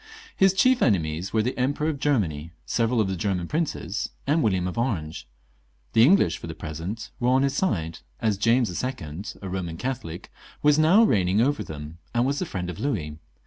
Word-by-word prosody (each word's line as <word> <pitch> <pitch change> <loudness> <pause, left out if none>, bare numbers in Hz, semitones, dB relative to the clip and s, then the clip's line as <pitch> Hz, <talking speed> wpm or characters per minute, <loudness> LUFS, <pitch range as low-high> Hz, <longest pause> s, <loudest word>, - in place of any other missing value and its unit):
His 195 0 +5
chief 255 +5 +4
enemies 85 -4 +1
were 110 -1 +2
the 125 - -2
Emperor 145 +4 0
of 155 -3 -2
Germany, 85 - 0
several 115 0 +1
of 105 - +2
the 95 - -2
Grerman 90 -1 -1
princes, 150 - -2 0.2
and 150 +4 +2
William 95 -7 +1
of 90 - -4
Orange; 90 - -2 0.7
the 110 - +5
English, 135 - +5
for - - -8
the - - -6
present, 85 +9 -6
were 125 -1 +1
on 130 +1 +4
his 140 -1 +1
side, 85 - -1 0.2
as 105 -3 0
James 115 0 +3
II., 125 +9 -2
a - - -4
Eoman 90 +1 -6
Catholic, 120 -8 -5 0.3
was 150 0 +5
now 175 +8 +6
reigning 95 - +2
over 140 +5 +2
them, 75 +2 -8 0.2
and 120 +1 +3
was 140 +2 0
the 185 - -2
friend 90 - -4
of 90 -2 -6
Louis. 80 - -2
110 Hz, 190 wpm, -25 LUFS, 85-135 Hz, 0.7 s, now